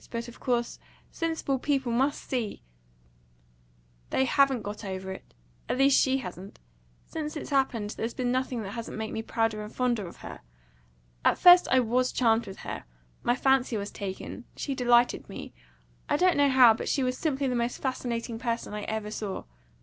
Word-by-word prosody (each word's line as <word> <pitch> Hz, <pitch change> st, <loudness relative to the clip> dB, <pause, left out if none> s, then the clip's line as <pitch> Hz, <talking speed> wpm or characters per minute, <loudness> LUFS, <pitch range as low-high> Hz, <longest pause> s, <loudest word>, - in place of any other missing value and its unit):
But, 235 Hz, 0 st, -4 dB
of 240 Hz, -, -12 dB
course, 240 Hz, -2 st, -1 dB, 0.3 s
sensible 320 Hz, -5 st, -1 dB
people 270 Hz, -3 st, 0 dB
must 270 Hz, +5 st, 0 dB
see 235 Hz, -, -3 dB, 0.7 s
" -, -, -35 dB
"They 265 Hz, -, +2 dB
haven't 270 Hz, -3 st, +3 dB
got 205 Hz, +2 st, -6 dB
over 190 Hz, -1 st, -5 dB
it. 190 Hz, -, -10 dB, 0.3 s
At -, -, 0 dB
least 270 Hz, 0 st, +5 dB
she 265 Hz, 0 st, +2 dB
hasn't. 190 Hz, -5 st, -8 dB, 0.5 s
Since 305 Hz, -1 st, -5 dB
it's 295 Hz, -, -7 dB
happened, 245 Hz, -6 st, +1 dB
there's 225 Hz, +2 st, -4 dB
been 245 Hz, -1 st, 0 dB
nothing 255 Hz, -2 st, -1 dB
that 195 Hz, -, -6 dB
hasn't 230 Hz, 0 st, -6 dB
made 220 Hz, 0 st, -4 dB
me 220 Hz, -, -2 dB
prouder 225 Hz, -1 st, -1 dB
and 210 Hz, 0 st, -7 dB
fonder 240 Hz, -6 st, 0 dB
of -, -, -11 dB
her! -, -, -8 dB, 0.8 s
At -, -, +4 dB
first 355 Hz, 0 st, +8 dB
I 260 Hz, -, +5 dB
WAS 250 Hz, +2 st, +1 dB
charmed 230 Hz, -2 st, +2 dB
with 195 Hz, -, -8 dB
her -, -, -5 dB, 0.4 s
my 240 Hz, -, +2 dB
fancy 265 Hz, -3 st, +2 dB
was 200 Hz, 0 st, -4 dB
taken; 200 Hz, +5 st, -6 dB
she 280 Hz, -, -3 dB
delighted 245 Hz, -1 st, +3 dB
me -, -, -8 dB, 0.6 s
I -, -, +3 dB
don't 365 Hz, +2 st, +4 dB
know 285 Hz, -1 st, +4 dB
how; 255 Hz, -3 st, +7 dB
but 220 Hz, -, -4 dB
she 275 Hz, -, +1 dB
was 255 Hz, 0 st, 0 dB
simply 275 Hz, -1 st, -1 dB
the 255 Hz, -, 0 dB
most 240 Hz, 0 st, -1 dB
fascinating 235 Hz, -3 st, -3 dB
person 235 Hz, -3 st, -3 dB
I 210 Hz, -, -4 dB
ever 220 Hz, -1 st, -3 dB
saw. 210 Hz, -3 st, -4 dB
240 Hz, 185 wpm, -28 LUFS, 215-265 Hz, 0.8 s, first